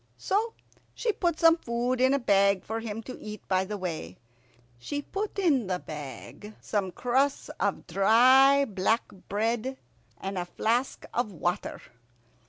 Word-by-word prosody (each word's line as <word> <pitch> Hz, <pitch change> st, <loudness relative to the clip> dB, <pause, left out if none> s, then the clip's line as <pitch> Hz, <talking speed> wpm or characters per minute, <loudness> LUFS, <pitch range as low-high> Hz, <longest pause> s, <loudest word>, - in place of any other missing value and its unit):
So 440 Hz, +4 st, -1 dB, 0.4 s
she 470 Hz, -, 0 dB
put 345 Hz, -5 st, -1 dB
some 330 Hz, 0 st, +6 dB
food 245 Hz, -1 st, -1 dB
in 260 Hz, +1 st, +5 dB
a -, -, +3 dB
bag 200 Hz, -6 st, +3 dB
for 225 Hz, +1 st, -3 dB
him 225 Hz, 0 st, -5 dB
to 255 Hz, -, -8 dB
eat 210 Hz, -1 st, -8 dB
by 185 Hz, 0 st, +1 dB
the 210 Hz, +2 st, -4 dB
way. 160 Hz, -, -5 dB, 0.6 s
She 290 Hz, -, -4 dB
put 410 Hz, +6 st, -4 dB
in 290 Hz, -, +2 dB
the 185 Hz, -1 st, 0 dB
bag 155 Hz, +7 st, -9 dB
some 200 Hz, -3 st, -2 dB
crusts 265 Hz, +7 st, 0 dB
of -, -, -1 dB
dry 260 Hz, +7 st, +5 dB
black 215 Hz, +1 st, +1 dB, 0.3 s
bread 230 Hz, +5 st, -1 dB, 0.4 s
and 195 Hz, -1 st, -3 dB
a 175 Hz, -, -2 dB
flask 235 Hz, +8 st, -1 dB
of 240 Hz, -3 st, -1 dB
water. 175 Hz, 0 st, -2 dB
225 Hz, 150 wpm, -28 LUFS, 195-270 Hz, 0.6 s, some